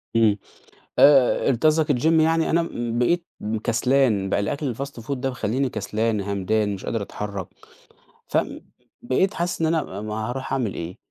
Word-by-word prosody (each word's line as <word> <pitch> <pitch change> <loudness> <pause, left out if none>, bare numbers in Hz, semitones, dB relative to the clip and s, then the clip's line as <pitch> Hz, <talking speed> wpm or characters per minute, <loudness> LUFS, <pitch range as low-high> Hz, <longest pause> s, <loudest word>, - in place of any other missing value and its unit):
إمم 110 -3 +4 0.6
آآ 135 -4 +6
أنت 125 +2 0
قصدك 155 -1 +4
الGym 125 +2 0 0.2
يعني؟ 165 +1 +2
أنا 170 +1 +3
مم 120 -7 -3
بقيت 170 +8 +2 0.4
كسلان، 115 -4 +2
بقى - - +1
الأكل 130 +4 -2
الFast 140 0 -6
food 115 - -7
ده 135 0 -2
مخلّيني 125 +2 -1
كسلان، 110 0 -1
همدان، 100 +1 0
مش 95 - -9
قادر 115 - -2
أتحرك، 100 -2 -5 0.8
ف - - 0
ب - - -2 0.4
بقيت 190 +10 +1
حاسس 175 -1 -2
إن 160 - +3
أنا 155 - -1
ما 105 0 -4
هاروح 130 +1 -5
أعمل 120 -7 -1
إيه؟ 85 +2 -6
120 Hz, 170 wpm, -23 LUFS, 105-145 Hz, 0.8 s, آآ